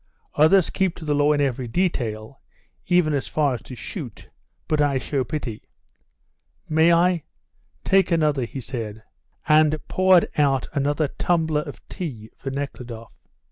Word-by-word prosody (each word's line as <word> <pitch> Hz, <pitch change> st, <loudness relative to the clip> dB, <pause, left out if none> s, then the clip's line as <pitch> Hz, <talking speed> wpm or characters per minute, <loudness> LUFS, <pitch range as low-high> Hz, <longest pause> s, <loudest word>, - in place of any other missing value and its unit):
Others 160 Hz, +4 st, +4 dB
keep 190 Hz, -3 st, 0 dB
to 160 Hz, -, -9 dB
the 150 Hz, -, +1 dB
law 145 Hz, +1 st, +3 dB
in 145 Hz, -1 st, +2 dB
every 130 Hz, -3 st, -1 dB
detail, 120 Hz, -, -2 dB, 0.5 s
even 175 Hz, -4 st, +3 dB
as 140 Hz, -, -1 dB
far 145 Hz, -3 st, +1 dB
as 120 Hz, -, -5 dB
to 130 Hz, -, -10 dB
shoot, 120 Hz, -, -8 dB, 0.4 s
but 155 Hz, -1 st, +1 dB
I 145 Hz, -2 st, +2 dB
show 135 Hz, +1 st, -1 dB
pity. 125 Hz, -5 st, -6 dB, 1.0 s
May 160 Hz, +2 st, +4 dB
I? 170 Hz, 0 st, +3 dB, 0.6 s
Take 195 Hz, -1 st, +3 dB
another," 150 Hz, -6 st, +1 dB
he 130 Hz, +3 st, -7 dB
said, 110 Hz, -4 st, -6 dB, 0.4 s
and 155 Hz, 0 st, +4 dB
poured 185 Hz, -2 st, +4 dB
out 135 Hz, -3 st, +2 dB
another 145 Hz, +1 st, +1 dB
tumbler 160 Hz, 0 st, 0 dB
of 145 Hz, -2 st, -10 dB
tea 120 Hz, -, -7 dB
for 135 Hz, -, -6 dB
Nekhludoff. 125 Hz, -4 st, -6 dB
145 Hz, 145 wpm, -23 LUFS, 130-160 Hz, 1.0 s, Others